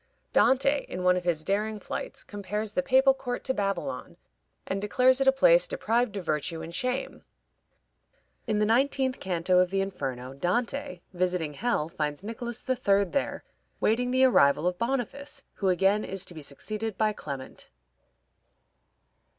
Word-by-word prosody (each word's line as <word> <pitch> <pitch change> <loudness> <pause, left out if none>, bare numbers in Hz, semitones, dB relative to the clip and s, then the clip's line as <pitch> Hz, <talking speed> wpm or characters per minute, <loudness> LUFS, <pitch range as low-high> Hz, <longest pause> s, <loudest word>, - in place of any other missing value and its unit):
Dante, 275 +2 +4
in 180 - -4
one 180 0 +5
of 180 -1 -3
his 165 -3 +1
daring 210 +4 -1
flights, - - -6
compares 205 +1 -4
the 275 - 0
papal 270 0 +4
court 250 -2 -5
to 260 - 0
Babylon, 200 +5 -3 0.5
and 195 +1 -3
declares 255 +5 +3
it 270 - +2
a - - +9
place - - +5
deprived 240 - 0
of 185 - -5
virtue 155 +1 -2
and 165 +1 -8
shame. 255 +5 -2 1.2
In 215 -2 +1
the 210 - +3
nineteenth 260 +3 +1
canto 180 0 +1
of 180 0 +3
the 195 +1 0
Inferno, 135 -10 -4
Dante, 180 - -2
visiting 180 -4 -1
hell, 205 -3 0
finds 150 0 -3
Nicholas 230 +2 -5
III. 200 -6 +3
there 200 +9 -2 0.4
waiting 245 +3 +1
the 260 +1 +3
arrival 150 - +4
of 180 0 0
Boniface, 270 +3 -3
who 195 - 0
again 195 +4 +3
is 195 0 -3
to - - -8
be 160 - -9
succeeded 210 +9 -5
by 215 -1 +2
Clement. 140 -8 -8
210 Hz, 155 wpm, -28 LUFS, 180-250 Hz, 1.2 s, a